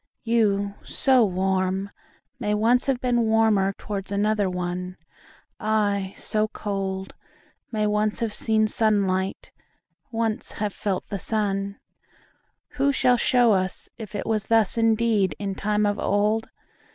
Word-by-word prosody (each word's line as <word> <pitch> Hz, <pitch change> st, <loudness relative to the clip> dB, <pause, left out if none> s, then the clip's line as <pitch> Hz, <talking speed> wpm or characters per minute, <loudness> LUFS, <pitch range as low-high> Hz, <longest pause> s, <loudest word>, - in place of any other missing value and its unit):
You, 205 Hz, -4 st, +1 dB
so 260 Hz, -4 st, +3 dB
warm, 190 Hz, 0 st, 0 dB, 0.5 s
may 210 Hz, -3 st, 0 dB
once 235 Hz, +5 st, +2 dB
have 265 Hz, -3 st, +1 dB
beenWarmer 225 Hz, -5 st, +2 dB
towards 200 Hz, -2 st, -5 dB
another 205 Hz, 0 st, +1 dB
one:I, 185 Hz, +3 st, -3 dB
so 215 Hz, 0 st, 0 dB
cold, 195 Hz, -2 st, -4 dB, 0.6 s
may 215 Hz, -2 st, 0 dB
once 210 Hz, 0 st, 0 dB
have 230 Hz, -2 st, 0 dB
seenSunlight, 210 Hz, -3 st, 0 dB, 0.6 s
once 225 Hz, -2 st, -2 dB
have 210 Hz, -1 st, -3 dB
felt 195 Hz, -3 st, -3 dB
the 200 Hz, -, -3 dB
sun:Who 205 Hz, +7 st, -4 dB
shall 250 Hz, -2 st, +3 dB
show 240 Hz, -2 st, +4 dB
us 185 Hz, 0 st, -2 dB
if 215 Hz, -2 st, -8 dB
it 205 Hz, -, -3 dB
wasThus 220 Hz, -1 st, +2 dB
indeed 225 Hz, -6 st, +2 dB
in 200 Hz, -1 st, -3 dB
time 210 Hz, +2 st, 0 dB
of 205 Hz, 0 st, 0 dB
old? 210 Hz, +2 st, +1 dB
210 Hz, 115 wpm, -24 LUFS, 195-225 Hz, 0.6 s, show